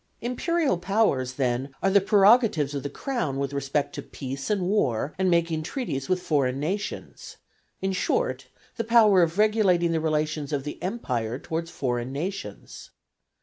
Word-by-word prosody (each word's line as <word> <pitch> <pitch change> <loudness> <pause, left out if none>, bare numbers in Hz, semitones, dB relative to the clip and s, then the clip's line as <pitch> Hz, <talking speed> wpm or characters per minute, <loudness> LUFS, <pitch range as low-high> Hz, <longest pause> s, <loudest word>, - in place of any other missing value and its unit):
Imperial 270 - 0
powers, 175 - +1
then, 130 +1 -1
are 195 - +3
the 200 0 +5
prerogatives 200 - +4
of 140 - -3
the 145 - -4
Crown 235 - -3
with 140 0 -2
respect 140 +1 -1
to - - -5
peace 135 0 -6
and 205 -3 +1
war, 155 - 0
and 190 -1 +2
making 170 -2 +1
treaties 155 - -4
with 185 -1 0
foreign 135 -4 +1
nations; 195 +7 -5 0.5
in 190 - +1
short, 465 - -1 0.3
the 230 - 0
power 220 -4 +5
of 165 +1 +1
regulating 205 -6 +3
the 165 -1 0
relations 155 -1 -1
of 140 -2 -1
the 150 - -7
Empire 125 - -2
towards 165 +3 -4
foreign 125 -5 -2
nations. 190 +8 -6
165 Hz, 155 wpm, -26 LUFS, 140-200 Hz, 0.5 s, the